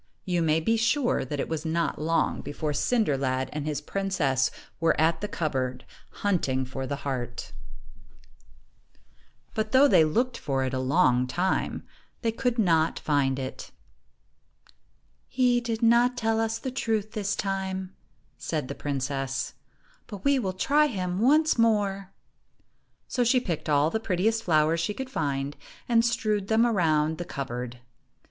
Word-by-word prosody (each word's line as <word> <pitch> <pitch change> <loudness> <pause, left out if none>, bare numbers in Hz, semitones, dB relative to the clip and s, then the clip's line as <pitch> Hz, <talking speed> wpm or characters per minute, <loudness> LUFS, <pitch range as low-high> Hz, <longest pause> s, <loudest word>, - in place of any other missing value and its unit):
You 175 -2 0
may 160 -1 +3
be 225 +8 +1
sure 235 +4 +1
that 145 +2 -4
it - - -1
was 160 -2 -3
not 165 -1 -1
long 165 +2 +1
before 150 +1 -3
Cinder 220 - +1
lad 130 -1 -1
and 150 0 -4
his 150 -2 -2
princess 165 -10 0 0.3
were 165 -1 +2
at 160 +1 +2
the 210 - -2
cupboard, 130 -8 -2 0.4
hunting 135 -10 +1
for 130 +1 -5
the 140 - -2
ii3 140 - -11
heart. 125 -3 -4 2.0
But 215 0 -2
though 270 +2 +7
they 165 - +6
looked 235 +11 0
for 135 -2 -1
it 130 -1 -2
a 130 - -1
long 130 -2 +3
time, 180 +8 -1 0.4
they 225 - +2
could 245 +1 -1
not 165 -6 +2
find 140 -3 +1
it. 130 -1 -6 1.6
"He 245 -2 +2
did 230 -1 -3
not 240 +2 +4
tell 225 -2 +1
us 225 0 0
the 260 +3 -5
truth 220 -4 -1
this 205 -2 -2
time," 190 -1 -3 0.4
said 150 -5 -3
the - - -3
princess, 135 -1 -3 0.5
"but 200 -4 -9
we 280 -1 +4
will 195 -6 -1
try 295 +10 +3
him 185 -7 -3
once 300 +4 +4
more." 200 -4 +1 1.0
So 250 - 0
she 245 +2 +4
picked 175 -10 -4
all 150 +2 +3
the 220 - 0
prettiest 220 +2 0
flowers 155 0 +3
she 185 +5 -1
could 265 +2 -6
find, 140 - -2 0.3
and 230 -1 +4
strewed 215 -4 0
them 225 +2 +4
around 160 -8 +1
the - - -2
cupboard. 125 -5 -5
180 Hz, 155 wpm, -27 LUFS, 145-225 Hz, 2.0 s, though